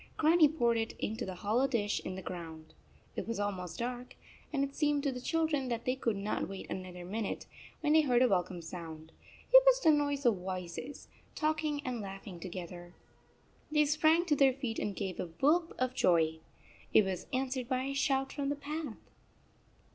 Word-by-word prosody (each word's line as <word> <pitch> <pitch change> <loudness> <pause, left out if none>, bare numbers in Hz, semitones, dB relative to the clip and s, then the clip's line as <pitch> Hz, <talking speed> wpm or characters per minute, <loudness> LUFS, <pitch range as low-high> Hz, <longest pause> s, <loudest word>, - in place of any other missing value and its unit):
Grannie 315 -1 +6
poured 240 -7 +2
it 225 - -2
into 220 -1 -3
the 185 - -5
hollow 220 +8 +1
dish 210 -6 0
in 185 - -4
the 190 - -7
ground. 160 -3 -7 0.4
It - - -4
was 230 -2 -2
almost 185 -5 -3
dark, 245 +1 -4 0.4
and 280 -3 +1
it 275 0 -3
seemed 290 -2 +1
to 280 - +1
the 250 -1 -6
children 315 -3 0
that 235 -1 -3
they 255 - +1
could 230 -4 0
not 200 +2 -2
wait 195 -1 -7
another 180 -1 -6
minute, 210 +3 -3 0.4
when 300 -1 +2
they 315 - +7
heard 250 -4 +3
a - - +5
welcome 180 -4 0
sound. 160 -2 -8 0.4
It - - +11
was - - +7
the 320 - +6
noise 285 -2 +1
of 230 -5 +4
voices, 185 +8 -6 0.3
talking 310 -1 -1
and 250 -3 -2
laugh 195 -1 -7
ing 180 -4 -8
together. 175 -1 -8 0.7
31 - - -10
They 300 -1 +5
sprang 310 +3 +3
to 310 -4 +2
their 270 -2 +5
feet 250 -4 -3
and 205 - -2
gave 190 -2 -4
a - - -2
whoop 300 - +2
of 255 0 0
joy. 160 -7 +3 0.5
It 215 - +6
was 185 -2 -3
answered 260 -1 -2
by 255 -1 0
a 275 +1 -2
shout 270 -1 +1
from 280 -1 -2
the 285 - 0
path. 290 -3 -5
245 Hz, 195 wpm, -32 LUFS, 185-285 Hz, 0.7 s, It